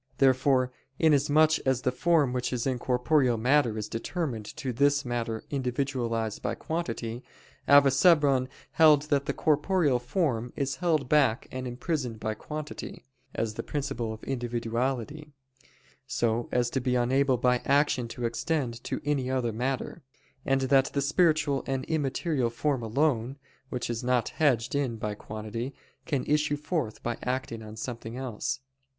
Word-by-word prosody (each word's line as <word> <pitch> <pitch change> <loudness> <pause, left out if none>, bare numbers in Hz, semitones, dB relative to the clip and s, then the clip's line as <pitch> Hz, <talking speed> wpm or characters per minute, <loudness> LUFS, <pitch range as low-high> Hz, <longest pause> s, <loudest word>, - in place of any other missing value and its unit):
Therefore 130 -1 +3 0.3
inasmuch 155 0 +4
as 130 -1 +1
the 125 - +2
form 150 -1 +2
which 125 -1 -1
is 125 -2 -2
in 130 -2 0
corporeal 125 0 +2
matter 125 -1 +2
is 105 -1 -3
determined 115 - -3
to 135 -5 -3
this 140 +3 +2
matter 115 -2 -3
individualized 125 -5 -2
by 105 - -2
quantity, 120 -8 -4 0.4
Avicebron 140 -1 +5 0.2
held 155 -3 +6
that 140 0 +1
the - - 0
corporeal 155 -3 +2
form 125 -3 -1
is 140 -1 -2
held 160 -7 +1
back 135 -5 +3
and 130 0 -4
imprisoned 125 -2 -3
by 110 0 -2
quantity, 150 +7 -7 0.3
as 115 -1 -1
the - - -4
principle 135 -6 -3
of 110 0 -9
individuality, 125 +4 -3 0.7
so 120 -3 0
as 120 -1 +1
to 130 - -1
be 125 0 0
unable 130 +2 +2
by 125 0 +2
action 140 -3 +2
to 120 +1 -5
extend 120 -1 -2
to - - -3
any 140 -3 0
other 130 -3 0
matter: 130 +7 -3 0.4
and 135 0 +1
that 135 0 +4
the 140 - +1
spiritual 150 -3 +2
and 135 -1 -2
immaterial 145 -3 0
form 130 +2 -1
alone, 125 +1 0 0.3
which 125 - -3
is 120 -1 -3
not 125 -2 +1
hedged 130 -6 +1
in 140 -5 0
by 105 -1 -3
quantity, 110 +5 -6 0.3
can 140 -5 -1
issue 150 0 +1
forth 150 -6 -3
by 120 0 -3
acting 125 -3 -3
on 110 0 -9
something 115 +1 -6
else. 130 +1 -3
130 Hz, 150 wpm, -28 LUFS, 120-145 Hz, 0.7 s, held